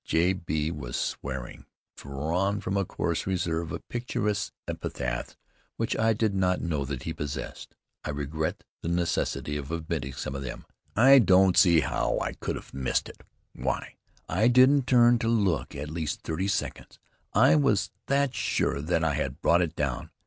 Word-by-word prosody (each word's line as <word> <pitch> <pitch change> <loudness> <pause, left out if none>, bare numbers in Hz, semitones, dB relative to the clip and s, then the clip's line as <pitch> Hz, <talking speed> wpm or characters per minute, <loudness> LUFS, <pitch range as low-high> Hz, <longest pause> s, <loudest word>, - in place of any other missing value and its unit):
J. 85 +3 +2
B. 80 -3 -2
was 75 -7 -6
swearing, 65 -2 -4 0.3
drawing 85 +9 -1
from 95 -1 -3
a 100 - +2
choice 95 - -2
reserve 85 -3 -1
of - - -6
picturesque 105 -4 -2 0.2
epithets 65 -1 -4 0.4
which - - -1
I 110 0 +3
did 110 -1 0
not 90 -1 +1
know 75 -5 -1
that 65 -2 -5
he 80 - -3
possessed. 75 -2 -6 0.3
I - - -5
regret 75 +2 -3 0.2
the - - -5
necessity 85 -3 -1
of 70 +1 -6
omitting 80 -5 -3
some 65 - -5
of 70 - -4
them. 65 -3 -6 0.3
"I 135 +5 +8
don't 95 -4 +5
see 85 -4 +6
how - - 0
I - - -2
could - - -4
have - - -10
missed 65 -1 -1
it! - - -14 0.3
Why, - - -3 0.3
I 100 +7 +2
didn't 130 +2 +5
turn 120 -1 +5
to 115 - -1
look 95 - +1
for - - -7
at 75 +1 -5
least 80 -3 -3
thirty 85 +5 -2
seconds. 100 - -3 0.4
I 75 - +6
was 75 - +2 0.2
that 140 -1 +2
sure 70 - 0
that 80 +2 0
I 80 -2 +2
had 70 -1 -2
brought 85 +1 +4
it 85 -2 -1
down. 70 -4 -2
85 Hz, 175 wpm, -27 LUFS, 75-100 Hz, 0.4 s, I